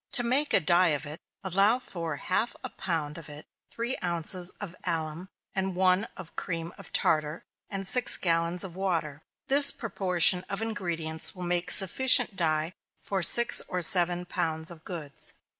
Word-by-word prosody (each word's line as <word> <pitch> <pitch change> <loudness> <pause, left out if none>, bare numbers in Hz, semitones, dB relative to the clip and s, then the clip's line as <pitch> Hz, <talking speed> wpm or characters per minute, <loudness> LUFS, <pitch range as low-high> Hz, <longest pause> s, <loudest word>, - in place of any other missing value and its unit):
To 245 - +1
make 265 +5 +1
a - - +5
dye 175 +3 +3
of 150 - -11
it, 150 +2 -8 0.2
allow 195 +5 +2
for 170 -10 -6
half 185 - -2
a - - -7
pound 165 -4 -4
of 155 - -13
it 150 +1 -10 0.2
three 235 +3 -4
ounces 175 +1 0
of 190 -4 -8
alum, 165 +1 -4 0.2
and 190 -1 -3
one 185 +2 +2
of 180 -3 -12
cream 165 -1 -5
of - - -14
tartar, 155 +1 0 0.3
and 195 -1 -5
six 245 +4 +5
gallons 170 0 0
of 180 -3 -9
water. 165 -6 -3 0.3
This 280 +1 +4
proportion 180 -6 +3
of 195 - -4
ingredients 170 -8 -3
will 180 - -8
make 175 0 -1
sufficient 245 +4 +5
dye 160 -1 -1 0.3
for 195 -2 -4
six 235 +7 +4
or 180 -1 -2
seven 175 +1 +4
pounds 160 -2 -3
of 165 -2 -13
goods. 155 -6 -7
180 Hz, 165 wpm, -27 LUFS, 165-195 Hz, 0.3 s, a